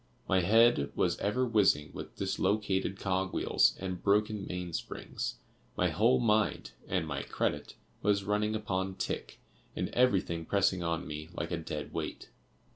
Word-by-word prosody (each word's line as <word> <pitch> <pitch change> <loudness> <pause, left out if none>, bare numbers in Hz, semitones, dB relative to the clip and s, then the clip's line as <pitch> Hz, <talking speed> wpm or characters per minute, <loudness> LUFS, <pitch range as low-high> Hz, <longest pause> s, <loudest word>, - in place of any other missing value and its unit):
My 95 - +3
head 110 -6 +4
was - - +2
ever 125 +6 +1
whizzing 100 -10 +3
with - - -8
dislocated 95 -1 0
cog 95 0 -1
wheels - - +3
and 95 -2 -4
broken 105 0 +1
main 90 -1 -4
springs; - - -4 0.4
my 90 - +3
whole 115 +10 +3
mind 110 -3 +1 0.2
(and 90 -3 0
my 70 -3 -3
credit) - - -2 0.3
was 100 -1 +2
running 105 +2 0
upon 95 -3 -2
tick, - - -4 0.4
and - - -2
everything 95 -9 +2
pressing 95 0 +2
on 85 -1 -1
me 75 +1 -6
like 85 0 -3
a 85 - 0
dead 80 -2 -5
weight. - - -5
95 Hz, 150 wpm, -31 LUFS, 85-105 Hz, 0.4 s, head